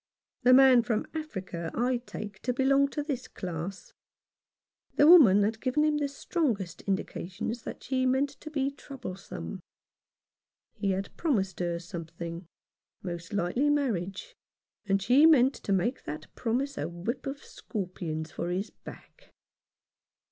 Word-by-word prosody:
The 250 -1 +5
man 260 -2 +8
from 230 -2 -1
Africa 190 - -5
I 245 +2 +1
take 210 -4 -8
to 250 - -1
belong 275 +2 +4
to 295 +1 -3
this 275 -4 -4
class. 180 +2 -6 1.0
The 290 - +6
woman 260 - +8
had 220 +2 -1
given 260 +4 +1
him 305 -1 +2
the 290 -1 0
strongest 245 - -2
indications 195 +3 -3
that - - -7
she 260 -1 0
meant 265 +2 +2
to 290 +2 -11
be 280 -2 0
troublesome. 195 - -7 1.1
He 200 - -2
had 195 +1 -2
promised 205 - 0
her 175 -1 -1
something, 170 0 -7 0.6
most 175 -2 -6
likely 205 +9 +1
marriage, 255 - -1 0.5
and 195 0 +3
she 255 +10 +6
meant 270 -4 +6
to - - -5
make 195 +7 0
that 150 +1 -7
promise 260 +4 -1
a - - -2
whip 205 +11 -4
of 275 +1 -5
scorpions 170 -6 -5
for 175 - -3
his 190 +4 -2
back. - - -14
225 Hz, 140 wpm, -29 LUFS, 185-275 Hz, 1.1 s, man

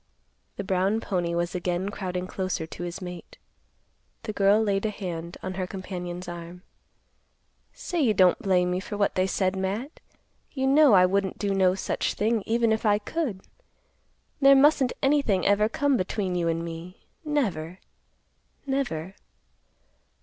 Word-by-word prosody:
The 200 - -4
brown 190 +3 +1
pony 175 -6 -2
was 175 +1 -1
again 180 +1 -2
crowding 185 -3 -4
closer 185 -3 -3
to 160 - -10
his 175 +2 -5
mate. 180 -1 -9 0.9
The 215 - -4
girl 200 +1 +4
laid 200 -3 0
a - - -1
hand 175 -5 -6
on 185 - -3
her 185 -1 -3
companion's 180 -2 -6
arm. 175 +1 -8 1.1
"Say 350 -3 -3
you 225 -7 +3
don't 185 -2 +4
blame 180 -2 +2
me 180 - 0
for 205 +2 -6
what 205 - +1
they 185 0 +1
said, 190 0 0
Matt. 200 +10 -3 0.5
You 265 -2 -1
know 280 -1 +6
I 185 -2 +7
wouldn't 195 0 0
do 200 -1 -1
no 190 -1 +3
such 190 - -2
a - - -18
thing 220 +1 +1
even 230 0 +2
if 220 - 0
I 205 -2 +4
could. 215 - -3 1.0
There 275 0 +7
mustn't 275 -2 +4
anything 270 -9 +2
ever 210 +2 +3
come 280 +2 +1
between 185 0 -2
you 175 -1 0
and 165 0 -1
me; 170 +2 -9 0.2
never—never. 195 - -5
190 Hz, 155 wpm, -26 LUFS, 180-220 Hz, 1.1 s, I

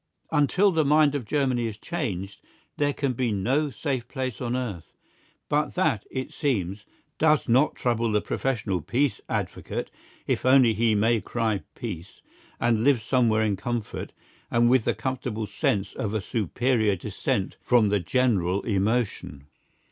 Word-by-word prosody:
Until 165 +6 +3
the 160 -3 +2
mind 150 0 +4
of 140 -5 -3
Germany 125 -1 0
is 105 -2 -6
changed, 100 - -4 0.4
there 145 -1 +2
can 140 -2 -1
be 120 -1 -1
no 130 +10 +1
safe 135 -4 -3
peace 130 -4 -4
on 120 0 -1
earth. 110 -10 -5 0.5
But 150 +1 0
that, 155 - +1
it 130 -1 -5
seems, 105 - -1 0.3
does 155 -1 +3
not 130 +5 +3
trouble 115 -2 0
the 105 - +3
professional 105 -8 -2
peace 135 - 0
advocate - - -3 0.3
if - - -1
only 130 -3 +5
he 110 0 +2
may 110 +2 +2
cry 110 -4 -1
Peace, 95 -7 -7 0.4
and 115 -2 +2
live 130 -4 +3
somewhere 115 -3 +2
in 105 -2 +1
comfort, 120 +2 -4 0.4
and 120 0 +3
with 130 -3 +3
the - - +1
comfortable 125 -4 -3
sense 100 0 -1
of 110 0 -3
a 110 - 0
superior 110 +1 +1
dissent 105 - -2
from 120 -4 +3
the 105 0 +2
general 100 -2 +1
emotion. 100 - -1
120 Hz, 150 wpm, -26 LUFS, 105-130 Hz, 0.5 s, only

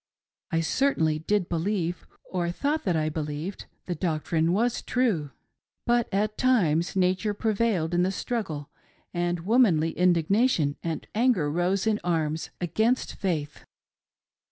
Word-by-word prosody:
I 165 -2 +1
certainly 160 - +1
did 190 +3 0
believe, 175 0 -2 0.2
or 175 -2 -1
thought 290 - -1
that 180 -4 +1
I 155 -1 +1
believed, 155 +4 -4 0.2
the 180 - -2
doctrine 160 0 0
was 230 +6 +1
true. 215 - 0 0.6
But 240 -1 +2
at 210 +2 -1
times 180 -11 +2
Nature 190 +3 +1
prevailed 210 -6 0
in 175 - +3
the 185 +1 +2
struggle, 185 - -4 0.4
and 175 -1 -1
womanly 180 -6 +3
indignation 175 - +2
and 165 -1 -3
anger 215 - +2
rose 180 +5 0
in 220 -1 +2
arms 160 -2 -1
against 220 +9 0
Faith. 155 -6 -3
180 Hz, 130 wpm, -26 LUFS, 160-215 Hz, 0.6 s, in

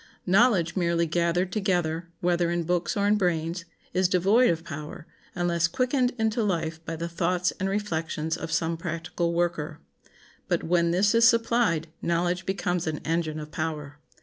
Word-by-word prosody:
Knowledge 190 -3 +3
merely 170 -2 +1
gathered 170 +3 0
together, 175 -5 -1
whether 175 -1 +2
in 170 0 0
books 175 +6 -1
or 200 - +1
in 210 +1 +4
brains, 170 -1 -1 0.3
is 185 -1 +2
devoid 195 +7 +4
of 165 -1 -1
power, 150 0 -8 0.3
unless 170 -1 +1
quickened 255 +4 +1
into 220 +1 0
life 165 -5 -2
by 165 - -4
the 165 +1 -4
thoughts 180 +1 0
and 190 - 0
reflections 165 -5 -2
of 165 - -6
some 165 0 0
practical 170 0 -3
worker. 170 -3 -1 0.7
But - - 0
when 170 0 +2
this 190 +5 +3
is 230 0 +7
supplied 230 -8 +1
knowledge 175 +1 0
becomes 180 -2 -1
an 155 -1 -1
engine 160 -1 -1
of 150 0 -8
power. 150 -2 -4
170 Hz, 160 wpm, -26 LUFS, 165-190 Hz, 0.7 s, is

